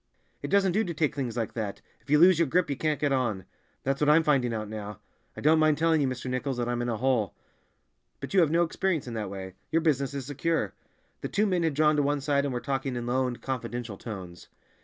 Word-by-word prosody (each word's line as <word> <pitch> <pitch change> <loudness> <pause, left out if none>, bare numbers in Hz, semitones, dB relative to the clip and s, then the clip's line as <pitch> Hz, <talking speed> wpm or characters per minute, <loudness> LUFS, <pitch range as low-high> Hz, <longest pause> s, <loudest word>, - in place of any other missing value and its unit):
"It - - -4
doesn't 195 -2 +3
do 215 +5 +2
to 170 -5 -4
take 150 -1 +1
things 125 -5 -3
like 115 -2 -2
that; 105 -4 -4 0.2
if - - -26
you 150 - +5
lose 175 +1 +6
your 170 - +3
grip 170 +2 +1
you - - 0
can't 155 +1 -1
get 145 -2 +1
on." 120 -8 0 0.4
"That's 135 +1 -1
what 150 - +4
I'm 160 +2 +6
finding 135 -6 +2
out 110 -2 -3
now. 105 -1 -6 0.4
I - - -6
don't 155 +2 +4
mind 155 -1 +4
telling 160 -1 +3
you, 140 - +2
Mr. 130 0 -4
Nichols, 130 +1 -2
that 120 -1 -1
I'm 120 0 -1
in 120 - -2
a 115 - -1
hole. 120 -4 0 0.8
But - - -7
you 195 - +5
have 165 -4 +4
no 170 +2 +3
experience 170 -1 -1
in 120 - -5
that 105 -3 -3
way; 95 -1 -7 0.2
your 165 0 +2
business 140 -4 +1
is 135 -2 -4
secure." 145 +4 -1 0.5
The - - -4
two 210 - +1
men 185 -4 +1
had 160 -4 0
drawn 150 0 +3
to - - +4
one 145 +1 +1
side 140 0 +1
and 140 - -1
were 125 - -2
talking 135 -1 -2
in 120 -1 -3
low 130 +2 +1
and 125 -1 -5
confidential 120 -4 -4
tones. 95 -6 -8
135 Hz, 255 wpm, -28 LUFS, 120-155 Hz, 0.8 s, lose